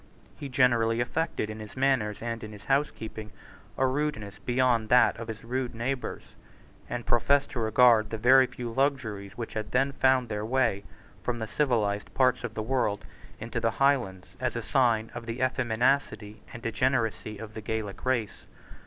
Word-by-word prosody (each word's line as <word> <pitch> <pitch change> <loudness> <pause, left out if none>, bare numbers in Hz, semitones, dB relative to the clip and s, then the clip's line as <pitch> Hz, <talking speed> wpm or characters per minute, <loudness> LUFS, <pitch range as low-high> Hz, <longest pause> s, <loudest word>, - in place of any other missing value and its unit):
He 140 - -7
generally 120 -3 +3
affected 120 -3 -1
in 110 - -8
his 105 +3 -10
manners 130 -6 +1
and 115 -1 -4
in 110 0 -8
his 105 0 -12
housekeeping 110 -6 -2 0.5
a 130 - +3
rudeness 130 -7 -2
beyond 120 -3 +1
that 125 0 +5
of 115 0 -7
his 110 -1 -7
rude 125 +1 -3
neighbours, 125 +3 -3 0.7
and 120 -1 -4
professed 140 +4 +2
to 125 - -4
regard 110 -1 +4
the 110 - -3
very 130 +3 +6
few 120 -2 -6
luxuries 120 -7 -1
which 115 -2 -5
had 110 -1 -5
then 135 +2 +2
found 130 -2 +2
their 105 -1 -3
way 115 -4 0 0.4
from 120 -1 -2
the 110 - -3
civilised 110 -5 0
parts 130 -1 +3
of 115 -2 -5
the 110 - -2
world 110 -4 -1 0.3
into - - -4
the - - +1
Highlands 125 -10 +1
as - - -1
signs 115 -4 +2
of 120 0 -7
the 115 +2 -4
effeminacy 125 -3 0
and 120 - -10
degeneracy 115 -5 -1
of 110 0 -9
the 110 - -7
Gaelic 105 -1 -4
race. 120 -5 -2
115 Hz, 170 wpm, -28 LUFS, 110-130 Hz, 0.7 s, very